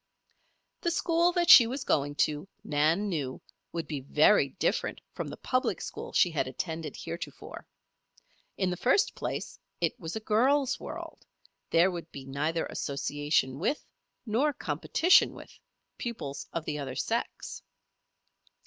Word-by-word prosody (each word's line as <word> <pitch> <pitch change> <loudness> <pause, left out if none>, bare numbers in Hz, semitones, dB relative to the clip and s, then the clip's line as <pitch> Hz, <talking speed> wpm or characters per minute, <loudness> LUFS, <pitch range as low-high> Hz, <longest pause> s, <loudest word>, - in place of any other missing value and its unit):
This 340 -1 0
school 340 +1 +3
that 350 -1 +1
she 235 - +11
was 260 +3 -4
going 145 0 0
to, 150 +4 -5 0.2
Nan 155 +7 +2
knew, 145 -9 -3 0.3
would 165 -1 -3
be 150 -3 -4
very 145 +3 +4
different 160 - -1
from - - -4
the - - -7
public 255 0 0
school - - -6
she 175 - +4
had 145 -4 -1
attended 160 +3 -4
heretofore. 165 +1 -7 0.9
In 190 -2 +1
the 180 - -3
first 260 - +3
place, - - -5 0.2
it - - -1
was 165 +1 -6
a - - -1
girls' 260 +6 +2
world; - - -8 0.5
there 170 +3 +4
would 170 -2 -7
be 135 -1 -9
neither 150 +5 -1
association 145 -1 -1
with, 225 - -1 0.4
nor 255 +7 +1
competition 350 +5 +3
with, - - -13 0.4
pupils 145 - -5
of 165 -1 -4
the 150 -1 -3
other 135 -2 -5
sex. - - -3
165 Hz, 140 wpm, -29 LUFS, 145-235 Hz, 0.9 s, she